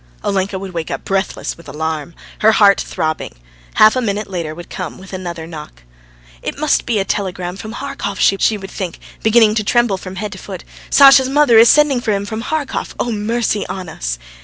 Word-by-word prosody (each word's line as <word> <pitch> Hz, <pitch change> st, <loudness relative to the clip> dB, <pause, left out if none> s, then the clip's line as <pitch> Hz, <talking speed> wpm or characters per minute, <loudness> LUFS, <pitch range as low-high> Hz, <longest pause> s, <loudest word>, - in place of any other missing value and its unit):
Olenka 195 Hz, 0 st, -1 dB
would 190 Hz, -1 st, -7 dB
wake 165 Hz, -2 st, -4 dB
up -, -, -5 dB
breathless 195 Hz, 0 st, -2 dB
with 170 Hz, -3 st, -14 dB
alarm, 160 Hz, +2 st, -4 dB, 0.2 s
her 220 Hz, +1 st, +5 dB
heart 200 Hz, -2 st, +5 dB
throbbing. 155 Hz, 0 st, -3 dB, 0.4 s
Half 215 Hz, +2 st, +6 dB
a 255 Hz, -, +1 dB
minute 210 Hz, -2 st, -2 dB
later 170 Hz, -5 st, -4 dB
would 175 Hz, +1 st, -10 dB
come 185 Hz, +1 st, -7 dB
another 175 Hz, -3 st, -5 dB
knock. 150 Hz, -, -10 dB, 0.6 s
"It -, -, -5 dB
must 305 Hz, +1 st, +1 dB
be 235 Hz, -3 st, +1 dB
a 195 Hz, -, 0 dB
telegram 180 Hz, -3 st, -3 dB
from 215 Hz, +3 st, -8 dB
Harkov," 275 Hz, -7 st, -5 dB
she 200 Hz, +2 st, +3 dB
would 195 Hz, -1 st, -9 dB
think, 180 Hz, -4 st, -5 dB, 0.2 s
beginning 220 Hz, -1 st, +5 dB
to 215 Hz, -1 st, 0 dB
tremble 240 Hz, -2 st, +2 dB
from 185 Hz, 0 st, -8 dB
head 210 Hz, +1 st, -4 dB
to 190 Hz, -, -8 dB
foot. 190 Hz, -3 st, -8 dB, 0.3 s
"Sasha's 270 Hz, -1 st, +7 dB
mother 275 Hz, -5 st, +5 dB
is 230 Hz, -, +7 dB
sending 295 Hz, -4 st, +4 dB
for 220 Hz, -3 st, 0 dB
him 200 Hz, 0 st, -2 dB
from 220 Hz, +2 st, -4 dB
Harkov.... 300 Hz, +1 st, -3 dB
Oh, 240 Hz, -, -1 dB
mercy 215 Hz, 0 st, -1 dB
on 185 Hz, -1 st, -6 dB
us!" -, -, -4 dB
200 Hz, 195 wpm, -17 LUFS, 180-230 Hz, 0.6 s, Sasha's